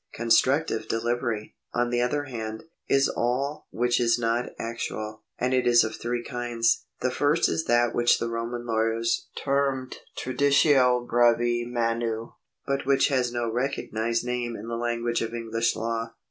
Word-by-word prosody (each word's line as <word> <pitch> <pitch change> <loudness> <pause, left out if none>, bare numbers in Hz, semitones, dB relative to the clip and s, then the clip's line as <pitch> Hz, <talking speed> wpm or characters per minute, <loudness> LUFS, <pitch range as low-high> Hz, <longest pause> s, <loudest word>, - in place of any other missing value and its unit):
Constructive 130 +3 +2
delivery, 115 -1 -2 0.2
on 120 0 +1
the 120 0 +1
other 145 +4 0
hand, 110 -5 -6 0.3
is 135 0 +4
all 135 +5 -2
which 120 +1 +1
is 115 -1 +3
not 115 +1 0
actual, 110 -2 -5 0.2
and 125 +1 0
it 130 -1 +2
is 120 -1 +6
of 110 - -3
three 120 0 -3
kinds. 120 -2 0 0.2
The 130 - +1
first 145 +5 +2
is 160 - -1
that 120 0 +3
which 120 0 +4
the 115 - -2
Roman 115 +1 -4
lawyers 115 0 0
termed 135 -2 -1 0.2
traditio 130 -2 +3
brevi 120 0 +3
manu, 115 -1 -1 0.3
but 140 -1 -2
which' 140 +1 +4
has 130 -3 +1
no 120 -1 -2
recognised 115 -2 -1
name 120 -1 -2
in 110 +1 -8
the 115 - -3
language 120 0 -1
of 115 +1 -3
English 115 0 -1
law. 115 0 -3
120 Hz, 155 wpm, -26 LUFS, 115-125 Hz, 0.3 s, is